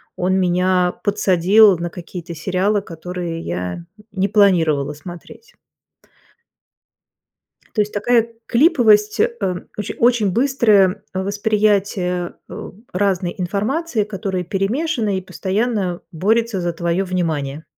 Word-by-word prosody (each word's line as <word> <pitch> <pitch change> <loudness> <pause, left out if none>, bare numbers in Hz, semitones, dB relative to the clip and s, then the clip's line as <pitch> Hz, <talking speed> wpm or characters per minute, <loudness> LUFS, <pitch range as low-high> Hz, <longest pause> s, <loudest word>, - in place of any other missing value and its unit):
он 180 +1 0
меня 180 0 +2
подсадил 200 0 +4
на 170 +1 -3
какие-то 175 -1 -8
сериалы, 190 +5 0
которые 175 -1 -6
я 90 - -4 0.3
не 195 0 0
планировала 165 -9 +3
смотреть. 175 +9 -12 2.2
То 215 - +2
есть 210 0 0
такая 230 +2 +2 0.2
клиповость, 230 - +4
э, - - +3 0.5
оче 210 - -4
очень 235 -4 +3
быстрое 215 -5 +3
восприятие, 200 -2 0
э, - - -8 0.2
разной 185 -2 0
информации, 215 - -1
которая 195 -3 -4
перемешана 215 - -1
и 185 - -3
постоянно 195 -1 -2
борется 215 +4 +1
за 175 -1 -1
твоё 170 +3 -1
внимание. 160 -5 -2
195 Hz, 105 wpm, -19 LUFS, 175-215 Hz, 2.2 s, подсадил